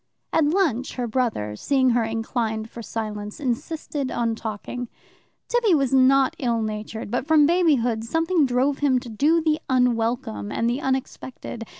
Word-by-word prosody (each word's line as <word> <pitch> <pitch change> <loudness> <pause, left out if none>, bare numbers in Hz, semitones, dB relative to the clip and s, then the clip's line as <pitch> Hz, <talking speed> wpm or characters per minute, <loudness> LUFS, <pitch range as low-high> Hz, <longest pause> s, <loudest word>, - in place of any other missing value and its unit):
At 320 - +4
lunch 295 - 0
her 250 - -2
brother, 220 - -1
seeing 260 - +2
her 235 -1 +2
inclined 225 0 -2
for 235 - -8
silence, 210 -2 -5
insisted 280 +2 -3
on 230 -1 0
talking. 225 +2 -5 0.6
Tibby 465 -7 +3
was 275 -3 +1
not 265 0 +4
ill 235 -3 0
natured, 215 0 -5
but 250 +3 -1
from 310 -2 +5
babyhood 285 -10 +2
something 325 +4 +1
drove 260 +3 +1
him 275 -3 +3
to 245 -1 -10
do 305 +9 +2
the 310 -1 +1
unwelcome 230 - 0
and 230 - 0
the 245 +4 -1
unexpected. 260 -3 -4
250 Hz, 155 wpm, -24 LUFS, 225-285 Hz, 0.6 s, from